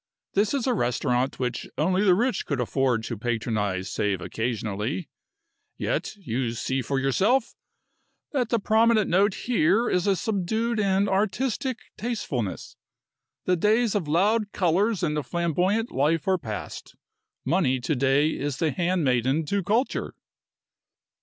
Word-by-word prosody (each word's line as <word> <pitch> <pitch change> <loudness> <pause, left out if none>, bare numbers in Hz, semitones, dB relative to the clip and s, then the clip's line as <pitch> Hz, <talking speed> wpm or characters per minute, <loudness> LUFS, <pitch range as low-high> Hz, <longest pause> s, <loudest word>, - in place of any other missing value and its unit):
This 205 +6 +2
is 265 - -1
a 255 - +2
restaurant 125 - 0
which 125 -2 -3
only 185 +5 +2
the 185 -3 +5
rich 240 +2 0
could 140 -3 -1
afford 125 -1 +1
to 120 - -4
patronize 110 -5 -1
save 100 -2 -1
occasionally, 110 - -3 0.7
yet - - -2
you 125 - -2
see 130 +3 -2
for 135 +3 -1
yourself 200 - +2 0.8
that 250 -6 0
the 235 - +2
prominent 220 0 +3
note 195 +3 +3
here 225 0 +2
is 180 +2 +1
a 195 - +4
subdued 220 +3 -1
and 200 0 +2
artistic 225 +6 0 0.2
tastefulness. 145 - -3 0.7
The 180 - +3
days 215 +5 +2
of 195 -7 -1
loud 205 +7 +2
colors 190 +3 +1
and 150 -3 0
of - - -4
the - - -26
flamboyant 180 +7 0
life 155 +6 +1
are 190 -1 +2
past. 110 -8 -7 0.5
Money 135 -4 +2
to 150 +4 0
day 135 +3 +3
is 145 -3 -3
the 160 -2 +1
handmaiden 150 -5 +1
to 200 +6 0
culture." 220 +8 -1
175 Hz, 140 wpm, -25 LUFS, 130-210 Hz, 0.8 s, the